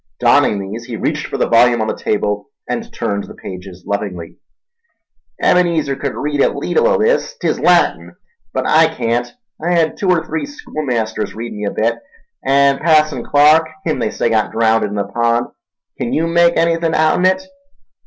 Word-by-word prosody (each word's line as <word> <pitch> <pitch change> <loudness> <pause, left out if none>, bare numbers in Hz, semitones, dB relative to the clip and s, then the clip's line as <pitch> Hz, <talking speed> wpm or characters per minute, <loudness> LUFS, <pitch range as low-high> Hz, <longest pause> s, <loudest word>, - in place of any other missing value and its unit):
Donning 105 - +3
these, 100 +4 -6
he 120 -1 -6
reached - - -2
for - - -4
the - - +1
volume 120 +1 +4
on 110 - 0
the - - -2
table 105 -1 -2 0.2
and - - -4
turned 100 0 -3
the - - -12
pages 90 -1 -10
lovingly. 100 -5 -5 1.0
"Ebenezer 165 -6 +2
cud 140 -1 -4
read 145 -1 -1
a - - +4
leetle 465 +1 0
o' - - +3
this—'tis 485 +2 0
Latin—but 470 0 -1
I 160 +1 +5
can't. 120 0 -2 0.3
I 175 +2 +1
hed 165 -2 +1
two 195 - -1
er 175 -3 +2
three 290 -2 -3
schoolmasters 125 - -4
read 115 +1 -6
me 105 0 -5
a 100 - -1
bit, 115 +2 -1 0.4
and 140 0 +3
Passon 155 -1 +2
Clark, 150 +3 +4 0.2
him 155 - -1
they - - 0
say 115 - -1
got 110 -1 +1
draownded 110 -1 +2
in 105 - -5
the 100 - 0
pond—kin 115 +2 -3
yew 160 - +1
make 170 0 +3
anything 165 0 +1
outen 160 +4 +3
it?" 190 +10 +1
135 Hz, 170 wpm, -17 LUFS, 110-165 Hz, 1.0 s, I